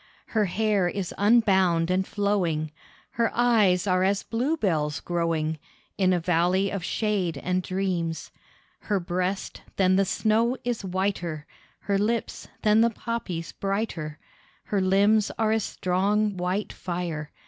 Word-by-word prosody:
Her 215 Hz, -2 st, +2 dB
hair 200 Hz, 0 st, +1 dB
is 185 Hz, 0 st, -3 dB
unbound 190 Hz, -6 st, +3 dB
and 190 Hz, +1 st, +1 dB
flowing, 180 Hz, -7 st, 0 dB, 0.4 s
Her 230 Hz, 0 st, +1 dB
eyes 215 Hz, -7 st, +3 dB
are 185 Hz, -2 st, +2 dB
as 200 Hz, +1 st, +1 dB
bluebells 210 Hz, -, 0 dB
growing 165 Hz, -2 st, -1 dB, 0.4 s
In 185 Hz, -2 st, +2 dB
a 180 Hz, -, +2 dB
valley 180 Hz, +3 st, +1 dB
of 195 Hz, -3 st, -4 dB
shade 190 Hz, -6 st, -1 dB
and 180 Hz, +5 st, -1 dB
dreams. 180 Hz, -3 st, -2 dB, 0.5 s
Her 205 Hz, -2 st, -1 dB
breast, 180 Hz, +2 st, -3 dB
than 185 Hz, -1 st, +3 dB
the 195 Hz, -, +3 dB
snow 225 Hz, +6 st, +1 dB
is 240 Hz, -3 st, -2 dB
whiter, 180 Hz, -5 st, -2 dB, 0.4 s
Her 200 Hz, -1 st, 0 dB
lips, 225 Hz, +2 st, -2 dB, 0.2 s
than 215 Hz, +1 st, +5 dB
the 230 Hz, -, +4 dB
poppies 215 Hz, -7 st, -4 dB
brighter, 195 Hz, -7 st, -3 dB, 0.5 s
Her 200 Hz, -2 st, -1 dB
limbs 200 Hz, +3 st, +3 dB
are 220 Hz, -1 st, +2 dB
as 220 Hz, -2 st, +1 dB
strong 200 Hz, +3 st, 0 dB
white 185 Hz, +3 st, -2 dB
fire. 170 Hz, -4 st, -4 dB
190 Hz, 135 wpm, -26 LUFS, 175-210 Hz, 0.5 s, than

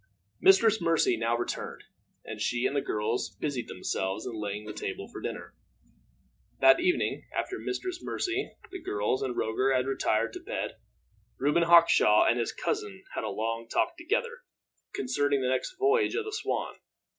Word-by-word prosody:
Mistress 230 Hz, -, +5 dB
Mercy 165 Hz, -7 st, +3 dB
now 115 Hz, +1 st, 0 dB
returned, 120 Hz, -, -4 dB, 0.4 s
and -, -, -7 dB
she 120 Hz, 0 st, 0 dB
and -, -, 0 dB
the 140 Hz, -, +2 dB
girls 110 Hz, +1 st, -2 dB
busied 140 Hz, -5 st, -3 dB
themselves 95 Hz, +3 st, -3 dB
in 125 Hz, -, -4 dB
laying 105 Hz, -1 st, -4 dB
the -, -, -6 dB
table 400 Hz, -1 st, -5 dB
for -, -, -9 dB
dinner. -, -, -6 dB, 1.1 s
That 335 Hz, 0 st, +7 dB
evening, 360 Hz, 0 st, 0 dB
after 380 Hz, -, -2 dB
Mistress 370 Hz, -2 st, -4 dB
Mercy, 370 Hz, +2 st, -2 dB, 0.2 s
the 380 Hz, -2 st, -7 dB
girls, 105 Hz, +5 st, -1 dB
and 130 Hz, -3 st, -3 dB
Roger 130 Hz, +5 st, +1 dB
had 130 Hz, 0 st, +1 dB
retired 115 Hz, -4 st, 0 dB
to -, -, -6 dB
bed, -, -, -4 dB, 0.6 s
Reuben 145 Hz, +5 st, +2 dB
Hawkshaw 170 Hz, -10 st, +6 dB
and 120 Hz, -, +3 dB
his 115 Hz, -, -1 dB
cousin -, -, -3 dB
had -, -, -3 dB
a -, -, -2 dB
long 115 Hz, +1 st, -3 dB
talk 335 Hz, -, +1 dB
together, 470 Hz, +8 st, -2 dB, 0.5 s
concerning 145 Hz, -, 0 dB
the 125 Hz, -, +1 dB
next 130 Hz, -, -1 dB
voyage 410 Hz, +3 st, +2 dB
of 450 Hz, -, -1 dB
the 430 Hz, -, -5 dB
Swan. 440 Hz, -, -2 dB
145 Hz, 165 wpm, -29 LUFS, -, 1.1 s, That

